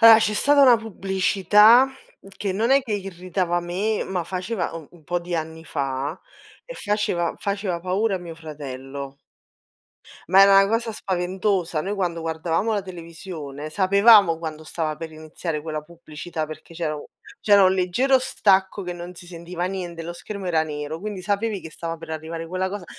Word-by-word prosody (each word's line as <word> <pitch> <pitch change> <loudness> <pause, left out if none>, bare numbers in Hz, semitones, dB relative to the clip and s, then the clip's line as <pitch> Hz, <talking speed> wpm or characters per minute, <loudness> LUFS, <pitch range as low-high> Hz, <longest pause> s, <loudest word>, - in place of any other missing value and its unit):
Allora, 225 -1 +10
c'è 215 -1 +1
stata 285 +5 +4
una 250 -3 +8
pubblicità, 210 +3 +4 0.5
che 195 -1 -2
non 220 +6 0
è 275 +1 +5
che 235 -4 -5
irritava 185 -2 -2
me, 190 +5 -1
ma 180 -3 -3
faceva 185 +3 -3
u 165 -3 -8
un 170 -3 -19
po' 175 +3 -1
di 175 0 -5
anni 160 0 -4
fa, 140 +2 -3 0.5
e - - -9
faceva 205 - -1
faceva 200 -3 -2
paura 190 +3 0
a - - -5
mio 170 -2 -8
fratello. 140 -3 -8 1.1
Ma 190 +1 +8
era 195 0 +8
'na 195 - +1
cosa 225 +1 0
spaventosa. 185 -3 -1
Noi 195 +6 -3
quando 175 -4 -2
guardavamo 165 +6 -1
la 205 - -1
televisione 165 -5 -8
sapevamo 200 0 +6
quando 160 -1 -6
stava 155 0 -3
per 160 +1 -7
iniziare 155 0 -5
quella 155 -1 -4
pubblicità, 160 0 -7
perché 155 +2 -11
c'era 160 -2 -2
u 145 - -9 0.3
c'era 205 -2 +6
un 185 - +5
leggero 190 +9 +2
stacco 195 -5 +2
che 180 -1 -4
non 175 +1 -8
si 175 - -13
sentiva 175 0 -5
niente, 180 -3 -4
lo 170 +1 -5
schermo 200 +3 -7
era 165 -3 +2
nero, 150 0 -5
quindi 205 -2 -5
sapevi 205 +1 -1
che 160 - -8
stava 165 +1 -5
per 165 0 -11
arrivare 160 +1 -5
quella 185 +2 -2
cosa, 200 -1 -6
180 Hz, 175 wpm, -23 LUFS, 160-200 Hz, 1.1 s, Allora